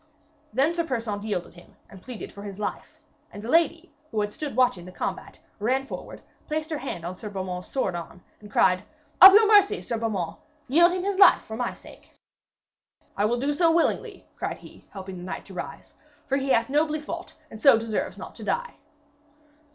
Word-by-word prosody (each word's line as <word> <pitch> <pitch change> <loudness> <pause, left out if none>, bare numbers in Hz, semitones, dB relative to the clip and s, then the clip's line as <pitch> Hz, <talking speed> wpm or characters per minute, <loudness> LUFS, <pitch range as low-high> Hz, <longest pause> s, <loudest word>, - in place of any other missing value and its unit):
Then 270 +8 +2
Sir 340 0 0
Persaunt 230 -8 -3
yielded 205 -5 -3
him 175 0 -17
and 190 - -14
pleaded 245 -1 -8
for 200 - -10
his 200 -2 -8
life, 210 - -5 0.3
and 205 - -9
the 230 - -6
lady, 335 +3 +2 0.2
who 215 -2 -1
had 205 0 -3
stood 295 -6 -5
watching 245 -9 +2
the 185 - -10
combat, - - -5 0.2
ran 255 +6 0
forward, - - -8 0.2
placed 310 +1 -3
her 305 - -2
hand 175 - -5
on 180 +1 -5
Sir 210 - -7
Beaumains' 185 -2 -5
sword 255 -9 -1
arm, 175 +1 -8 0.2
and 210 - -13
cried: 185 -2 +3 0.4
'Of 380 +1 +13
your 435 0 +7
mercy, 415 -1 +5
Sir 235 -2 -4
Beaumains, 200 -7 -2 0.3
yield 340 +6 +5
him 365 0 -2
his 400 0 -1
life - - +7
for 220 - -7
my 245 +1 -2
sake.' - - -16 1.1
'I 205 +1 +2
do 275 +4 0
it 290 - -5 0.2
willingly,' 340 - 0
cried - - -3
he, - - -15
helping 190 -2 -8
the - - -9
knight 185 - -6
to - - -12
rise, - - -8 0.3
'for 275 - 0
he 270 0 -2
hath 230 -3 +3
nobly 305 +2 +1
fought 335 +4 -7 0.2
and 220 - -10
so 275 -5 +7
deserves 225 -1 -3
not - - -9
to - - -9
die.' 485 0 -2
235 Hz, 195 wpm, -26 LUFS, 200-310 Hz, 1.1 s, Of